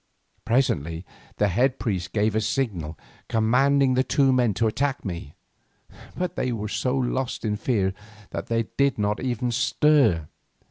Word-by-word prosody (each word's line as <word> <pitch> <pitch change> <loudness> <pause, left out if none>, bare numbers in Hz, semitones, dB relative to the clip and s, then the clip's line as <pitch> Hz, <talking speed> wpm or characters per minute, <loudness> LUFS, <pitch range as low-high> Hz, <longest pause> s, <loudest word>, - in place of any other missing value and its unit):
Presently 85 - 0 0.3
the 105 - +3
head 125 +8 +2
priest 95 -6 -2
gave 105 0 +1
a 110 - +2
signal 95 - -2 0.3
commanding 130 +4 +3
the 130 +1 +3
two 135 -1 +3
men 120 -5 +2
to 115 - +1
attack 135 +5 -1
me, 85 -6 -6 0.8
but 180 -1 -2
they 130 - -1
were 105 -2 -3
so 125 +5 -1
lost 130 -1 -2
in 105 -1 0
fear 105 -4 0 0.4
that - - -5
they 115 0 +1
did 140 -1 +2
not 105 0 0
even 125 -1 -1
stir. 115 - +3
115 Hz, 150 wpm, -25 LUFS, 105-130 Hz, 0.8 s, the